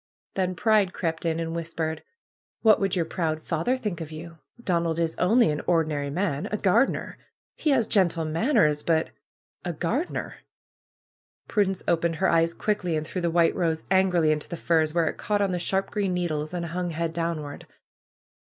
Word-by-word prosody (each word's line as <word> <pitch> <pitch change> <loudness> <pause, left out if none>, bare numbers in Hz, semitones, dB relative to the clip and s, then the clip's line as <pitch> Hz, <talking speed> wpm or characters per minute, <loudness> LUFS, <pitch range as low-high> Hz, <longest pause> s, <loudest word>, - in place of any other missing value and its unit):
Then 185 -1 -1
Pride 210 -1 +3
crept 165 0 -2
in 165 0 0
and 165 0 -3
whispered: 165 -1 -3 0.6
^^What 215 -1 +7
would 195 -2 0
your 170 -3 +1
proud 160 -2 -2
father 165 +11 -1
think 210 -9 -4
of 160 -1 -6
you? 165 +1 -9 0.2
Don 170 -7 0
ald 165 -1 -1
is 165 -1 0
only 225 +1 +4
an 150 - -2
ordinary 155 -4 +1
man! 155 -2 -1
A 210 - 0
gardener! 215 +7 +1 0.4
He 310 - -1
haa 260 -4 +4
gentle 180 -7 +2
manners, 160 - +2
but! 160 0 +1 0.5
A 175 - -3
gardener!" 230 - -2 1.1
Prudence 195 -3 0
opened 170 0 +1
her - - +1
eyes 165 0 +2
quickly, 205 -6 -1
and 155 - -3
threw 180 +3 -4
the 170 - +1
white 170 0 +3
rose 165 -3 0
angrily 180 -4 +4
into 150 -1 -2
the 170 - -5
firs, 160 -2 +2
where 165 0 +2
it - - -3
caught 210 -1 0
on 200 -2 +1
the 180 - -1
sharp 190 +3 -1
green 195 -4 0
needles 155 -4 -2
and 175 -1 -3
hung 175 +1 -3
head 165 0 -2
downward. 165 -4 -4
170 Hz, 180 wpm, -26 LUFS, 160-190 Hz, 1.1 s, ^^What